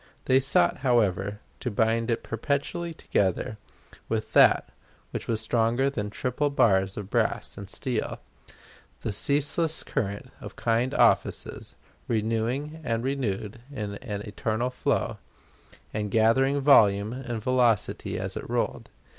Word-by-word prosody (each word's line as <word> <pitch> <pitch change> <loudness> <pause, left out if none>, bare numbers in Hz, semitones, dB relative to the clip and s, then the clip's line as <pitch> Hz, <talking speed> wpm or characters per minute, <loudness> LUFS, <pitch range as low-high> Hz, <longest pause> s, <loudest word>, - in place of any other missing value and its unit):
They 130 +1 +5
sought, 130 -10 +2
however, 105 -5 +1 0.2
to 125 - -2
bind 115 +2 +1
it 115 - 0
perpetually 140 +8 -2
together 105 - -1 0.5
with - - -2
that - - +6 0.4
which - - -5
was 110 -1 +1
stronger 120 +4 +2
than 105 -6 -3
triple 125 +7 -1
bars 95 -8 +2
of 105 -1 -6
brass - - 0
and 100 -1 -9
steel 130 +3 -3 0.8
the 110 - -3
ceaseless 145 +7 +1
current 100 -7 -3
of - - -9
kind 115 +3 0
offices, - - +1 0.3
renewing 115 +7 -1
and 115 -4 -1
renewed 115 -5 -2
in 105 -7 -5
an 105 -6 -5
eternal 110 +4 -2
flow, 125 - -1 0.7
and 105 -1 -2
gathering 130 +6 +3
volume 105 -6 +5
and 120 -4 -5
velocity 125 -4 +1
as - - -4
it - - -6
rolled. - - -2
115 Hz, 130 wpm, -27 LUFS, 105-135 Hz, 0.8 s, that